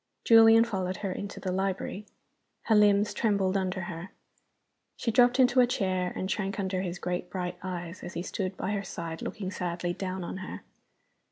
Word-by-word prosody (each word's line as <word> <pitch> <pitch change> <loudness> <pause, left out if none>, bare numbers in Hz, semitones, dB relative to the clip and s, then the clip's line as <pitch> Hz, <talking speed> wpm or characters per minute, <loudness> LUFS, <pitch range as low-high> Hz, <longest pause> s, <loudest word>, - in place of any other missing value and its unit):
Julian 225 0 +8
followed 190 -5 -2
her 190 - -1
into 200 +2 -6
the 185 - -3
library. 195 +2 -2 0.6
Her 225 - +2
limbs 205 0 +4
trembled 200 -4 +1
under 185 -1 -1
her. 175 +1 -6 0.9
She 230 - -1
dropped 245 +3 +4
into 255 0 +5
a 245 - +6
chair, 185 -6 0
and 190 - -2
shrank 195 0 -2
under 190 -1 -1
his 180 -1 -4
great 180 0 -3
bright 180 -1 -4
eyes, 180 -1 -5
as 175 - -7
he 175 - -2
stood 185 0 -3
by 195 - -2
her 205 -1 -1
side 165 -3 -6
looking 195 -4 -4
sadly 175 -1 -2
down 185 0 -4
on 170 - -5
her. 190 0 -7
190 Hz, 180 wpm, -29 LUFS, 180-205 Hz, 0.9 s, Julian